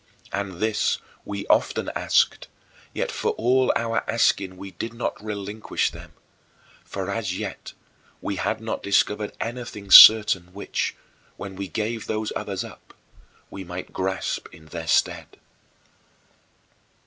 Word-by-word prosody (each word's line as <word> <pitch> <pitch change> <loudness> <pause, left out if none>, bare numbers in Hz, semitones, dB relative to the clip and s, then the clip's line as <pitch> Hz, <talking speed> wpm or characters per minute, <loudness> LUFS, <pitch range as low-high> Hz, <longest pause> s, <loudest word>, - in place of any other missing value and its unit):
And 100 -1 -3
this 105 +4 0 0.3
we 100 -1 -5
often - - +1
asked, - - +1 0.4
yet - - -2
for - - -1
all 130 +2 +2
our 115 -1 0
asking 100 -5 +1
we 95 +1 -8
did 115 +3 -6
not 115 - -4
relinquish 105 0 -2
them; - - -12 0.7
for 95 0 -5
as 100 -4 -2
yet - - -6 0.5
we 100 - -4
had 110 +5 -1
not 110 - -4
discovered 105 +1 +1
anything 115 -4 -6
certain 95 -5 +9
which, 100 - -2 0.4
when 95 -1 -7
we 100 0 -5
gave 110 +5 -3
those 110 0 -2
others - - -3
up, - - -14 0.6
we 95 - -7
might 90 0 -8
grasp 95 0 -2
in 80 - -15
their 80 +1 -7
stead. - - 0
100 Hz, 130 wpm, -24 LUFS, 95-110 Hz, 0.7 s, certain